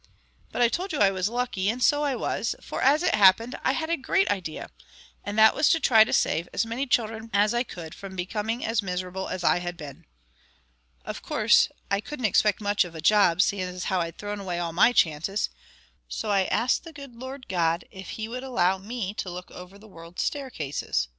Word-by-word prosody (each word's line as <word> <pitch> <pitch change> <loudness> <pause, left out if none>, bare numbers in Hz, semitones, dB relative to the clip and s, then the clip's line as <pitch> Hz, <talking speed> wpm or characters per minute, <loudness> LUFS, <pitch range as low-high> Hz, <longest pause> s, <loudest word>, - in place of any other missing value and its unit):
But 245 - +1
I - - +6
told 365 +11 -3
you 310 - -2
I 200 -5 +4
was 190 +1 -1
lucky, 235 -5 -1
and 245 +3 -1
so 290 +3 +3
I 280 -3 0
was, 225 -1 -2
for - - -6
as 290 +5 +4
it - - +2
happened 215 +4 +5
I 260 - +2
had 320 +2 -2
a - - +3
great 385 +8 +1
idea; 175 -6 -4 0.5
and 205 +1 -5
that 220 0 +7
was 300 - +3
to 325 - +3
try 225 -7 +5
and 215 - +4
save 165 +2 0
as - - 0
many 240 +5 -3
children 225 -2 -1
as 205 +2 +3
I 240 - +1
could 170 -9 -7
from 195 -1 -9
being 210 +6 -3
as 225 0 +1
miserable 185 0 -4
as 180 - -4
I 175 - +3
had 175 0 -5
been. 145 -4 -10 1.0
Of - - -6
course, - - +3 0.2
I 200 0 +1
couldn't 255 0 -5
expect 210 0 +2
much 205 0 +2
of 175 -2 -10
a - - -6
job, 195 0 +4
seeing 185 -2 -2
how 185 0 0
I'd 165 0 -5
thrown 205 0 -5
away 185 -3 -4
all 170 -1 -3
my 190 +8 +5
chances, 170 0 +1 0.6
so 215 - -3
I 195 -2 +3
asked 245 +6 +1
the 330 -1 -11
good 280 -4 -10
Lord 260 +2 -8
God 170 -2 0
if 190 -2 -10
He 220 0 -4
would 250 +2 -5
allow 190 -8 +1
me 205 -1 -4
to 185 - -3
look 180 +1 -8
after 180 +2 -11
the 215 +2 -16
world's 170 -2 -7
staircases." 150 - -3
205 Hz, 215 wpm, -26 LUFS, 180-240 Hz, 1.0 s, that